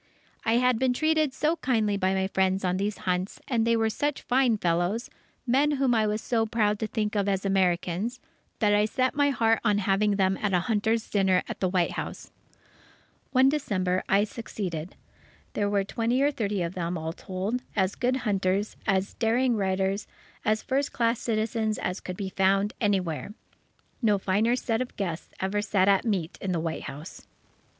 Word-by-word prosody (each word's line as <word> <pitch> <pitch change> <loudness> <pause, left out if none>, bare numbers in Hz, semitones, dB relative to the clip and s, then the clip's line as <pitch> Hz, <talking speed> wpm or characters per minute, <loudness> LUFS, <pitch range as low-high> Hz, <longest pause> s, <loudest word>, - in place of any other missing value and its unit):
I 225 - +2
had 250 -1 +3
been 260 -1 +2
treated 310 +1 +2
so 310 +5 0
kindly 220 -8 +1
by 190 -1 +1
my 190 0 +1
friends 190 0 +1
on 180 0 +1
these 200 +2 -2
hunts, 180 +1 -1
and 230 -3 +1
they 230 0 +3
were 225 0 +1
such 290 +4 -2
fine 250 -3 +2
fellows, 175 +5 0 0.3
men 275 +4 +3
whom 270 -3 +2
I 220 -2 +2
was 210 +1 -1
so 225 -2 +1
proud 210 -2 +1
to 220 - -1
think 215 -1 -2
of 200 -1 +1
as 195 0 -1
Americans, 190 +4 0 0.4
that 210 -2 +3
I 210 0 +4
set 255 +4 0
my 285 0 +3
heart 225 -4 +2
on 210 -3 +3
having 205 +1 +2
them 190 -1 +1
at 205 -2 0
a 180 - +3
hunters' 220 +2 0
dinner 190 -3 +2
at - - -6
the 185 - +1
White 180 -2 +1
House. - - -6 1.0
One 260 0 +4
December, 190 -11 0
I 200 +1 +4
succeeded. 190 -6 -5 0.6
There 205 -1 0
were 200 -1 +1
twenty 235 +6 0
or 290 - +3
thirty 205 -8 -1
of 170 +1 -3
them, 175 -1 -2
all 160 0 -4
told, 195 +8 -3
as 190 -2 +1
good 250 +1 0
hunters, 195 0 0
as 195 -1 +1
daring 240 +2 +1
riders, 195 0 0 0.4
as 215 +1 +1
first 275 +2 0
class 230 0 +1
citizens 220 -1 -1
as 180 +2 -3
could 185 -1 -6
be 195 -2 -3
found 195 +2 +2
anywhere. 195 -2 -1 0.7
No 210 -4 +3
finer 205 +5 +1
set 230 -2 -1
of 255 - -5
guests 175 -4 -3
ever 195 +2 0
sat 200 -2 +2
at 200 +2 +4
meat 190 -6 -2
in 190 -2 -1
the 170 - 0
White 160 0 -3
House. 150 +5 -9
210 Hz, 185 wpm, -27 LUFS, 190-230 Hz, 1.0 s, I